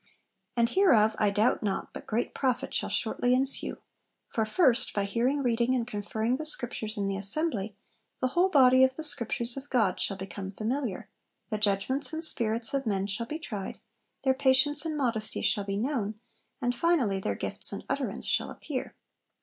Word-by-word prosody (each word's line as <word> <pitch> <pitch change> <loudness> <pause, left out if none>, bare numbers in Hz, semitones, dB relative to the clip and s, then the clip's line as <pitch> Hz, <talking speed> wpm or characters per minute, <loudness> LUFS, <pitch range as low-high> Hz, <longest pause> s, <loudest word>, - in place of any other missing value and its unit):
And 235 0 +4
hereof 225 - +4
I 210 - +4
doubt 210 +4 +2
not 200 -3 -2
but - - -9
great 230 +2 -1
profit 255 -3 -1
shall - - 0
shortly 245 +1 +1
ensue; 265 +1 0 0.5
for, 220 -2 0
first, 255 -1 +3
by 205 - +1
hearing 245 +8 0
reading 240 +1 +2
and 240 -2 0
conferring 220 +3 -1
the 310 - -5
Scriptures 225 -6 -3
in 200 -1 0
the 195 0 -1
Assembly, 205 - 0 0.4
the 255 - +1
whole 350 +7 +3
body 260 -5 +6
of 260 0 +3
the 315 - -5
Scriptures 235 -4 -1
of 275 +1 -7
God 220 -8 +2
shall 195 - 0
become 190 0 -6
familiar, 225 +2 -3 0.4
the 215 -1 -2
judgments 215 +8 0
and 320 +1 -3
spirits 230 -5 0
of 270 -3 -1
men 195 -2 0
shall 215 +4 -3
be 305 - -4
tried, 210 -11 -6 0.4
their 265 -1 +4
patience 275 +3 +3
and 310 -2 -2
modesty 230 -6 -1
shall 205 -2 +1
be 195 0 -2
known, 220 -3 -1 0.5
and 245 0 +2
finally 245 - +2
their 105 - -2
gifts - - -3
and - - -6
utterance - - -2
shall - - +1
appear.' - - -5
235 Hz, 180 wpm, -29 LUFS, 210-265 Hz, 0.5 s, body